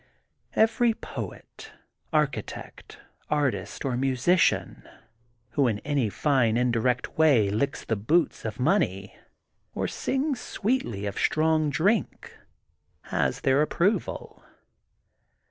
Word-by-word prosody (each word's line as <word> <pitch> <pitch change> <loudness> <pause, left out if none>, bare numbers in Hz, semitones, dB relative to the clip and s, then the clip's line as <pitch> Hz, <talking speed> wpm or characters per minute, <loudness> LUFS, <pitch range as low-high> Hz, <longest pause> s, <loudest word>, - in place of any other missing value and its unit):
Every 225 +1 +3
poet, - - -9 0.4
architect, 150 -3 -3 0.3
artist, 125 -11 -1
or 130 -2 0
musician 135 +7 +1 0.6
who 140 -3 +2
in 110 -3 0
any 140 -6 +1
fine 120 -2 +2
indirect 125 +2 0
way 125 -11 +4
licks 140 +7 -1
the 110 - 0
boots 155 +12 +1
of 110 +1 -5
money, 125 - 0 0.6
or - - -1
sings 270 0 -1
sweetly 190 - -2
of 100 -1 -4
strong 155 -1 +2
drink, 185 +9 0 0.7
has - - 0
their 135 +2 +3
ap 150 - +1
proval. 195 +6 -1
140 Hz, 105 wpm, -26 LUFS, 115-170 Hz, 0.7 s, way